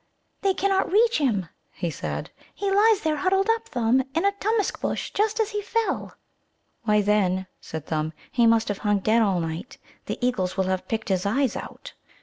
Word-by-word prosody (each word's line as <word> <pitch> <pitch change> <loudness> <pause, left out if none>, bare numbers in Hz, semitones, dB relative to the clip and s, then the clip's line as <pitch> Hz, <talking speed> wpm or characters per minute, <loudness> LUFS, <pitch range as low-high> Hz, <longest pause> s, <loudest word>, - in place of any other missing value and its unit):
"They 390 -2 +2
cannot 390 -2 +1
reach 455 +2 +4
him," 215 - +1 0.3
he 170 - -3
said. - - -5 0.2
"He 400 -1 -1
lies 420 +1 +4
there 310 -1 0
huddled 385 +3 +2
up, 455 0 -2
Thumb, 245 -1 +2
in 330 - +1
a 400 - +4
Tummusc 415 +1 -1
bush, - - -2
just 430 +2 +1
as 440 0 +1
he 415 0 -2
fell." 455 +2 -2 0.7
"Why, 210 -1 +4
then," 190 -2 +2
said 160 -2 -7
Thumb, 155 0 -1 0.2
"he 235 -2 +4
must 225 -1 +3
have 205 - -2
hung 205 -1 +2
dead 220 +4 +3
all 195 -5 +2
night. 165 +7 -5 0.3
The - - -3
eagles 200 -8 -1
will 190 - +3
have 185 0 -2
picked 220 -1 -3
his 190 0 +1
eyes 265 +4 +1
out." - - -8
245 Hz, 190 wpm, -25 LUFS, -, 0.7 s, reach